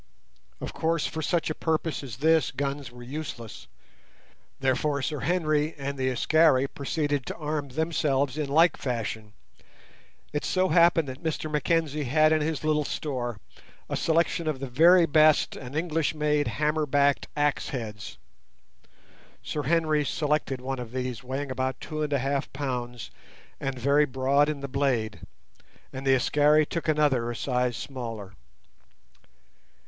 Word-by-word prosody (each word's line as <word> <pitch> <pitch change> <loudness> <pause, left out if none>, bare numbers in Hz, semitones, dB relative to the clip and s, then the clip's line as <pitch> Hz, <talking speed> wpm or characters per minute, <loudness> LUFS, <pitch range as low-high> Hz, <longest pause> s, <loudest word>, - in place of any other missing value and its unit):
Of - - -6
course, 165 -1 0
for 160 - -3
such 160 +1 0
a - - 0
purpose 160 0 -1
as 125 -6 -8
this 160 0 +3
guns 140 -1 -3
were 120 0 -11
useless. 130 -4 -7 0.9
Therefore 135 +2 0
Sir 150 0 -2
Henry 155 0 0
and 140 0 -4
the 130 -1 0
Askari 135 +1 +4
proceeded 145 0 -2
to - - -4
arm 150 -2 -3
themselves 145 -2 0
in 150 -2 -2
like 165 +4 +4
fashion. 110 -4 -4 1.0
It 150 - -1
so 185 0 +1
happened 170 -3 +4
that 130 +1 -7
Mr 155 -1 -3
Mackenzie 150 -1 0
had 155 +4 +4
in 155 -1 +3
his 155 0 -2
little 155 -1 +2
store 125 -7 -4 0.5
a - - -1
selection 165 0 +1
of 150 -4 -1
the 135 - -4
very 170 +7 +6
best 155 -1 +4
and 130 +1 -8
English 160 -1 0
made 150 -1 +1
hammer 150 +5 0
backed 140 0 +2
axe 145 -1 +1
heads. 105 -6 -6 1.3
Sir 150 - -3
Henry 155 0 +2
selected 150 -3 -1
one 135 0 -3
of 120 -1 -7
these 130 -1 -3
weighing 135 +2 -4
about 130 0 -2
two 155 0 -5
and 150 -1 -1
a 140 - +3
half 135 +1 -2
pounds 125 -4 -4 0.5
and 135 -1 -3
very 140 +4 +3
broad 135 +2 +2
in 150 -2 -3
the 140 - -4
blade, 125 -6 -1 0.7
and 135 +1 -5
the 135 - +6
Askari 150 +4 +4
took 165 +2 -4
another 145 -6 +2
a 120 - -4
size 125 0 -1
smaller. 115 -7 -6
145 Hz, 150 wpm, -27 LUFS, 130-155 Hz, 1.3 s, very